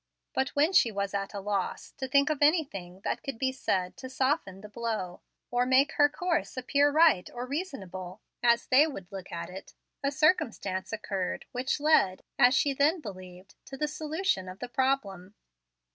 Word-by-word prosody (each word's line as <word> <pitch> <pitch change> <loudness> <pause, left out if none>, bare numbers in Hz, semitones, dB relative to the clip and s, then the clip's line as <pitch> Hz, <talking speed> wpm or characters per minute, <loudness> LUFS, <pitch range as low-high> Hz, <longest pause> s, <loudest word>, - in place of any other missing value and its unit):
But 265 - 0
when 305 +6 +3
she 235 - +5
was 200 -1 -3
at 195 +1 -3
a - - -3
loss 200 0 -3
to 265 - -3
think 280 +3 +3
of 295 - -3
anything 235 - +1
that - - -2
could 275 -4 -5
be 260 +2 0
said 185 -8 -1
to 260 - -8
soften 260 - -1
the 210 - -9
blow, 215 -5 -4 0.3
or 245 0 +2
make 260 +3 +4
her 290 -1 +4
course 340 -2 -2
appear 280 +3 +3
right 305 - +4
or 245 +1 -5
reasonable, 205 - -5 0.2
as 235 -1 +3
they 285 +5 +5
would 195 - -8
look 190 -2 -8
at 170 +1 -5
it, 190 +1 -10 0.3
a 275 - +2
circumstance 270 - +1
occurred 200 -4 -3
which 255 +3 -1
led, 285 -11 +3 0.2
as 250 0 +6
she 280 0 +2
then 295 +6 +2
believed, 185 - -10
to 270 - -9
the 300 - 0
solution 305 - -2
of 185 - -9
the 245 - -6
problem. 215 -8 -1
245 Hz, 180 wpm, -29 LUFS, 195-285 Hz, 0.3 s, as